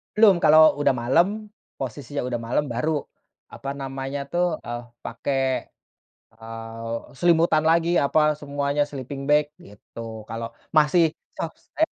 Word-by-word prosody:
Belum, 215 -3 +7
kalau 155 +1 +7 0.2
udah 140 -2 +4
malem, 150 +9 +4 0.5
posisinya 135 +2 -5
udah 120 -2 -2
malem 120 +6 0
baru 140 +7 0 0.6
apa 135 - -6
namanya 135 +1 -4
tuh, 175 +1 +1 0.2
eee, 120 0 -4 0.2
pakai, 135 +4 -2 0.9
eee, 115 0 -7
selimutan 165 -2 +4
lagi 165 +1 +3
apa 140 +2 +2 0.2
semuanya 145 0 -1
sleeping 140 -1 -7
bag 150 0 +5 0.2
gitu 110 +2 -9
kalo 115 +1 -4 0.3
masih 155 +3 +5 0.3
sore 165 - -4
140 Hz, 120 wpm, -24 LUFS, 115-155 Hz, 0.9 s, Belum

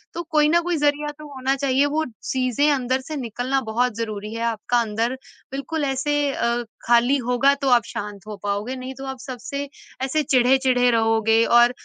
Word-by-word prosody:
तो 340 - -3
कोई 300 -1 +4
ना 340 +2 +4
कोई 345 -1 -1
ज़रिया 295 0 +1
तो 305 - -9
होना 265 0 0
चाहिए 275 0 +2
वो 315 - +2 0.3
चीज़ें 260 +3 +1
अंदर 260 -1 0
से 310 +4 -7
निकलना 250 +2 -2
बहुत 245 +2 +1
ज़रूरी 215 -2 -4
है, 230 - -5
आपका 235 +1 0
अंदर 225 +2 -1 0.4
बिल्कुल 285 +3 -3
ऐसे 270 +2 0 0.2
अ, 235 0 0 0.2
खाली 240 +4 +4
होगा 250 +3 +4
तो 270 - +2
आप 240 -2 +5
शांत 205 -1 -7
हो 210 -1 -6
पाओगे, 205 +5 -2
नहीं 255 +1 -6
तो 270 - -6
आप 265 -1 -6
सबसे 280 +3 -5 0.3
ऐसे 300 +3 0
चिढ़े-चिढ़े 255 -1 +3
रहोगे 225 0 +3
और 240 +1 +5
255 Hz, 180 wpm, -22 LUFS, 235-275 Hz, 0.4 s, आप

